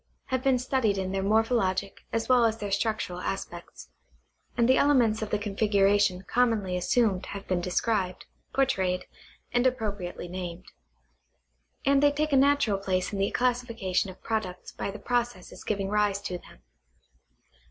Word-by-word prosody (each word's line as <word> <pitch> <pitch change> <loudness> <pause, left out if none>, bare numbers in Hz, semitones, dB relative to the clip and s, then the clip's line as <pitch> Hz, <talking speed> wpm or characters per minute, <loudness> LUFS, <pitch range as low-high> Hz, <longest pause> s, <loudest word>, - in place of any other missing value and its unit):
have 260 - +1
been 265 -1 +3
studied 245 -5 0
in 190 -1 -2
their 195 0 -1
morphologic 200 -2 +1
as 230 0 -1
well 250 -2 +5
as 225 -1 +2
their 205 -2 -5
structural 200 -3 -1
aspects, 175 -2 -6 0.7
and 235 -1 +4
the 260 - +5
elements 245 -7 +3
of 215 - -3
the 210 - +1
configuration 205 -2 +2
commonly 225 -7 +1
assumed 195 +1 +1
have 200 0 -7
been 180 -2 0
described, 185 +1 -1 0.3
portrayed, 190 -9 +1 0.5
and 245 +1 +3
appropriately 205 -8 -3
named; 180 0 -6 1.2
and 275 0 +4
they 290 0 +5
take 300 +1 -1
a - - +6
natural 275 -7 +3
place 185 0 -1
in 200 - -2
the 195 - +2
classification 230 -6 0
of 185 - -12
products 215 -5 -3
by - - -4
the 200 - -6
processes 240 -4 -3
giving 200 -2 -1
rise 205 -1 +1
to 180 -3 -5
them. - - -18
210 Hz, 150 wpm, -27 LUFS, 190-245 Hz, 1.2 s, a